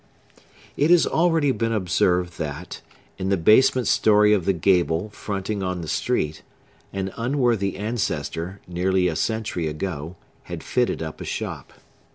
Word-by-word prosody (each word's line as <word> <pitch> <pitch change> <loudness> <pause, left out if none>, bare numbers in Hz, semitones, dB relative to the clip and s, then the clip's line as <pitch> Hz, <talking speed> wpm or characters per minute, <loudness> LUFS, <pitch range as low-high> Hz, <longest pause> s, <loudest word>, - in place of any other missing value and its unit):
It 150 - +3
has 175 -1 +6
already 165 -4 +2
been 115 -3 -1
observed, 90 -3 +1
that, 75 +2 -5 0.4
in 95 - -2
the 100 - +2
basement 120 +8 +4
story 105 -1 +4
of 95 -5 +1
the 100 - +3
gable 90 +2 +1
fronting 100 0 -4
on 90 -2 -2
the 80 - -6
street, 75 +1 -1 0.5
an 95 -1 -4
unworthy 120 -5 0
ancestor, 100 -4 -3
nearly 90 +1 +1
a 80 - -1
century 105 -4 -1
ago, 80 +1 -4 0.3
had - - -7
fitted - - 0
up - - -7
a - - -4
shop. - - -5
95 Hz, 145 wpm, -23 LUFS, 90-110 Hz, 0.5 s, has